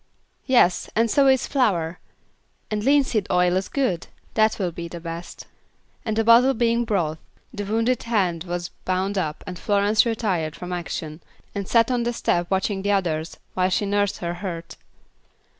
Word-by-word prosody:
"Yes, 240 -9 +3
and 230 0 +2
so 280 -2 +4
is 265 -1 +4
flour; 180 - 0 0.7
and 210 -1 -1
linseed 265 -6 +2
oil 180 0 +3
is 190 +1 -1
good; 225 -12 -1 0.3
that 220 0 +3
will 185 -4 -1
be 170 0 -6
the 170 0 -8
best," 165 +1 -7 0.6
and 220 -2 -2
the 225 - +3
bottle 240 +4 +6
being 235 0 +1
brought, 170 -8 -1 0.3
the 205 -3 -4
wounded 230 +4 +1
hand 185 -8 0
was 175 0 -4
bound 185 +2 -1
up 155 -6 -2
and 180 -3 -7
Florence 205 +1 +3
retired 195 -9 -1
from 180 0 -6
action 165 -2 -5 0.3
and 200 -2 -4
sat 230 +1 +3
on 245 -1 +1
the 240 +1 -1
step 175 -6 0
watching 195 +1 0
the 205 - -2
others, 170 -5 -1 0.2
while 185 0 +1
she 195 +2 0
nursed 205 0 0
her 170 -1 -3
hurt. 175 -2 -6
195 Hz, 170 wpm, -23 LUFS, 175-230 Hz, 0.7 s, bottle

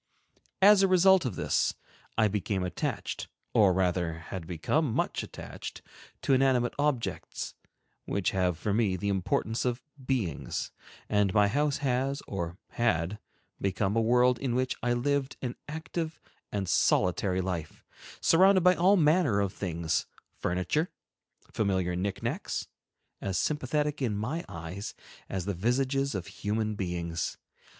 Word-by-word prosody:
As 205 0 +8
a 195 - +5
result 185 -2 +5
of 125 - -2
this, - - +1 0.4
I 110 -1 +5
became 100 -2 -1
attached, 90 -1 -3 0.3
or 100 -3 +6
rather 90 -2 +1
had 80 +1 -7
become 115 - 0
much - - 0
attached, - - -8 0.4
to 135 - +3
inanimate 130 -2 +3
objects, 145 -5 -1 0.5
which 100 -2 0
have 90 -3 +1
for 100 +3 -1
me 105 -4 +2
the 100 +3 -2
importance 100 +4 0
of 125 0 -1 0.2
beings, 115 - -2 0.4
and 105 -2 +2
my 105 -1 +6
house 145 +6 +1
has 135 +2 0
or 85 -3 -4
had 95 -3 0 0.4
become 100 +1 0
a 115 - +3
world 125 +2 +4
in 130 -3 -1
which 130 0 0
I 120 0 +1
lived 135 +2 0
an 125 -2 -4
active 160 +1 -4 0.3
and 100 -2 -2
solitary 90 +1 +2
life, 90 -4 -4 0.4
surrounded 185 +3 +6
by 180 +1 +6
all 185 +3 +4
manner 155 - +4
of 100 -1 0
things, 85 -5 -1 0.3
furniture, 90 - 0 0.6
familiar 95 -4 +1
knickknacks, 95 +2 -2 0.5
as 95 -2 -1
sympathetic 150 - 0
in 110 -6 0
my 140 +11 -2
eyes 90 +3 -6 0.3
as 95 -2 -3
the 100 - -1
visages 130 +6 0
of 95 -3 -3
human 110 +1 -2
beings. 85 -4 -3
110 Hz, 135 wpm, -29 LUFS, 95-135 Hz, 0.6 s, As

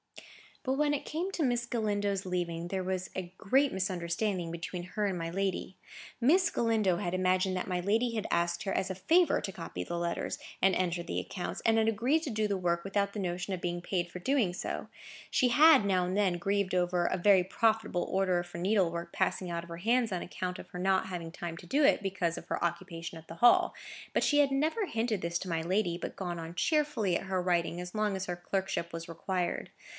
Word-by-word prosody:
But 260 - 0
when 295 +1 +2
it 280 - -5
came 345 +5 -2
to 345 - -1
Miss 245 -2 +1
Galindo's 205 -4 -1
leaving, 175 -2 -2
there 190 +1 -2
was 185 0 -2
a 180 -1 -5
great 270 +7 +2
misunderstanding 185 -1 -1
between 170 +1 -5
her 205 +4 -2
and 190 -2 -2
my 165 -1 -3
lady. 190 0 -2 0.4
Miss 335 +10 +4
Galindo 220 -6 +2
had 175 0 -2
imagined 185 0 +2
that 180 - -3
my 180 -2 -1
lady 225 +6 +1
had 215 - -2
asked 170 0 +1
her 195 - -1
as 190 0 0
a - - -4
favour 335 - +3
to 195 - -4
copy 165 - -6
the 170 - -4
letters, 170 0 -2 0.2
and 190 -1 +4
enter 180 -1 0
the 170 - -3
accounts, 185 - -5
and 225 0 +4
had 220 - +2
agreed 240 +9 +2
to 295 - -3
do 215 -1 0
the 200 -1 0
work 170 -2 0
without 200 0 0
the 210 - -4
notion 180 0 -2
of 180 - -4
being 175 0 -2
paid 175 -1 -2
for 180 - -6
so - - -18
doing. 250 -10 +2 0.8
She 255 - +3
had, 300 0 +7
now 185 -3 +2
and 180 +1 -2
then, 190 -4 +2
grieved 195 +1 0
over 175 -1 +1
a 185 - +1
very 190 0 +5
profitable 215 -2 +1
order 185 -2 +1
for 175 -1 -9
needlework 175 -3 0
passing 185 -1 0
out 170 0 -3
of 170 - -13
her 170 - -6
hands 230 +4 +2
on 180 - -2
account 180 0 -4
of - - -10
her 180 - -7
not 190 +1 +2
having 170 -3 -5
time 170 -1 -6
to 175 - -11
do 290 - +2
it, 275 - +4
because 185 -4 -1
of - - -9
her - - -2
occupation 170 -1 -3
at 160 0 -13
the 165 - -8
Hall; 240 +7 +5 0.4
but - - +2
she 290 - +3
had 280 -1 +4
never 315 +10 +1
hinted 225 - -1
this 170 0 -1
to 185 - -6
my 165 -1 0
lady, 175 0 0
but - - -6
gone 175 -2 -4
on 165 0 -6
cheerfully 290 - +1
at - - -7
her 190 -1 0
writing 175 -1 0
as 180 +2 -8
long 210 -2 +1
as 190 0 -3
her 180 - -3
clerkship 190 -1 -2
was 165 +1 -6
required. 180 +1 -2
185 Hz, 225 wpm, -31 LUFS, 175-215 Hz, 0.8 s, had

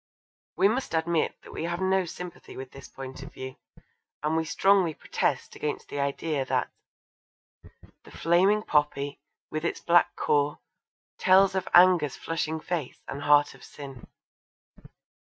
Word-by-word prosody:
We - - +5
must 230 -4 -1
admit 160 0 +1
that - - -12
we - - -3
have 170 0 -2
no 190 0 +2
sympathy 175 +1 -9
with 130 0 -8
this 135 - -11
point 135 -1 -9
of 140 +3 -9
view, 130 0 -8 0.7
and 155 +1 +1
we 160 0 +1
strongly 185 -1 +3
protest - - -2
against 150 - -4
the 145 - -4
idea 140 +1 -1
that - - -1 1.3
The - - -15
flaming 190 +5 +2
poppy, 145 -3 0 0.3
with 155 0 -3
its 170 - -1
black 175 0 +4
core, 145 0 +1 0.6
tells 190 +1 +5
Of 190 -1 -2
anger's 175 -6 +6
flushing 160 0 -3
face, 160 -5 -4
and 140 - -5
heart 145 0 +4
of - - -17
sin. 135 -4 -10
160 Hz, 145 wpm, -27 LUFS, 145-180 Hz, 1.3 s, anger's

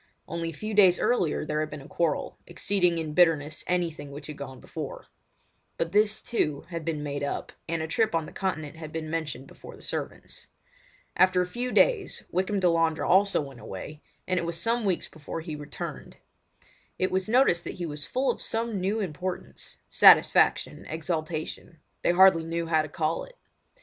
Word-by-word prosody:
Only 165 0 -3
a - - -7
few 215 +7 -5
days 190 -4 +6
earlier 175 -12 +1
there 150 0 -1
had 155 0 -1
been 150 -1 -7
a - - -12
quarrel, 165 -2 -1
exceeding 180 -4 +1
in 155 -2 -3
bitterness 155 -3 +3
anything 170 -5 -1
which 140 +1 -9
had 150 - -7
gone 130 -3 -8
before; - - -7 0.7
but 165 0 -1
this, 210 +2 +2
too, 150 -11 0
had 170 -2 -4
been 155 -2 -2
made 145 -1 -3
up, 140 - -3 0.2
and 165 -1 -1
a - - -3
trip 220 +3 +1
on 165 -1 0
the - - -10
Continent 160 -5 -3
had 155 -1 -8
been 155 -1 -4
mentioned 150 -5 -3
before - - -12
the - - -15
servants. - - -6 0.7
After 185 -1 +4
a - - -3
few 245 +7 -3
days 445 - +2
Wykham 190 +3 0
Delandre 165 -3 +2
also 195 0 +4
went 135 -4 -9
away, 150 +12 -8 0.3
and 185 -1 +1
it - - -3
was 170 0 -3
some 230 +2 0
weeks 185 -3 0
before 155 +1 -7
he 160 -2 -6
returned. 150 -1 -7 0.8
It 185 - 0
was 190 +2 0
noticed 235 -8 +4
that - - -5
he 175 - -4
was 150 -4 -4
full 260 - +1
of - - -7
some 225 -3 -2
new 200 +4 0
importance—satisfaction, 180 0 +3
exaltation—they 160 0 -3
hardly 185 -2 +6
knew 165 +1 -2
how 160 -1 +3
to 155 - -6
call 160 0 -1
it. - - -17
165 Hz, 180 wpm, -27 LUFS, 155-190 Hz, 0.8 s, days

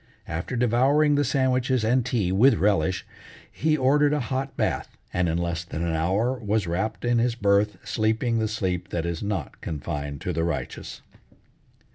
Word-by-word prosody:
After 85 +11 -4
devouring 130 +6 +3
the 145 0 +3
sandwiches 130 -2 +1
and 125 +3 +2
tea 115 -8 0
with 115 +7 +5
relish, 95 -4 +1 0.5
he 155 0 +1
ordered 145 +2 +3
a 150 - +1
hot 135 +2 -3
bath, - - -2 0.2
and 90 -1 +1
in 80 - 0
less 85 -1 -2
than 85 -1 -5
an 85 -1 -1
hour 100 +11 0
was 105 -2 0
wrapped 95 +8 -2
in 120 -1 +3
his 120 0 +1
berth 100 -1 +2
sleeping 115 +2 +1
the 110 - +1
sleep 95 -4 -2
that 85 -1 -2
is 85 -1 -3
not 100 -7 -4
confined 75 -2 -4
to 90 - -2
the 80 +1 0
righteous. 85 -2 -4
110 Hz, 170 wpm, -25 LUFS, 85-125 Hz, 0.5 s, with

